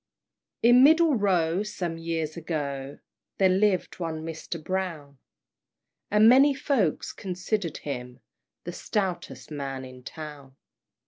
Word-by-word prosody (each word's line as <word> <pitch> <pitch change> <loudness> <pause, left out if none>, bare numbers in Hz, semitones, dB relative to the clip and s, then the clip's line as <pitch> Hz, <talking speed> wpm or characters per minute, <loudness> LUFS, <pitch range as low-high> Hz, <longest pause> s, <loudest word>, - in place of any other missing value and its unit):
In 245 +2 +7
Middle 320 +2 +6
Row, 185 -5 +2
some 180 -6 -4
years 165 -2 -3
ago, 145 -5 -4 0.4
There 190 -1 +4
lived 190 -1 +1
one 160 -2 -4
Mr. 165 +1 -5
Brown; 160 -5 -4 0.9
And 210 +1 +5
many 270 +4 +6
folks 245 - 0
considered 185 -2 -3
him 125 -3 -6 0.4
The 175 - -6
stoutest 190 -4 -3
man 135 -3 -4
in 130 0 -12
town. 145 -2 -9
170 Hz, 115 wpm, -27 LUFS, 150-205 Hz, 0.9 s, In